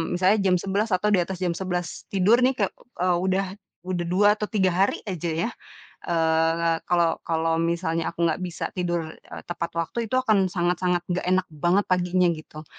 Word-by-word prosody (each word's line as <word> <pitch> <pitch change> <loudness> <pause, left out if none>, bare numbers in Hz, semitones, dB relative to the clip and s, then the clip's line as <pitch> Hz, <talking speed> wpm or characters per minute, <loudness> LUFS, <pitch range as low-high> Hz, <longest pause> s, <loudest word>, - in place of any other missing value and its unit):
misalnya 185 +4 +3
jam 180 -1 +4
11.00 200 +3 -1
atau 210 +3 0
di 190 - +4
atas 185 +1 -6
jam 175 - +1
11.00 180 -2 -4
tidur 200 +5 +4
nih, 265 - +3
kek - - 0 0.3
eee, 180 -1 +3
udah 190 +1 +1 0.4
udah 175 -2 -2
2 185 +4 +3
atau 210 - -2
3 190 -4 +2
hari 195 +2 +1
aja 175 -2 -3
ya, 165 +8 -1 0.6
eee, 165 0 +2
kalau 170 -2 +2
kalau 165 0 +1
misalnya, 165 -1 -1
aku 170 0 -2
gak 160 - -1
bisa 180 -2 -4
tidur 175 -1 0 0.2
e - - -13
tepat 170 -1 -3
waktu. 170 +8 -2
Itu, 255 - 0
akan 200 -5 +3
sangat-sangat 175 0 0
nggak 180 - 0
enak 185 0 +3
banget 175 +6 +2
paginya, 180 0 +2
gitu. 155 -1 -9
180 Hz, 185 wpm, -25 LUFS, 170-190 Hz, 0.6 s, jam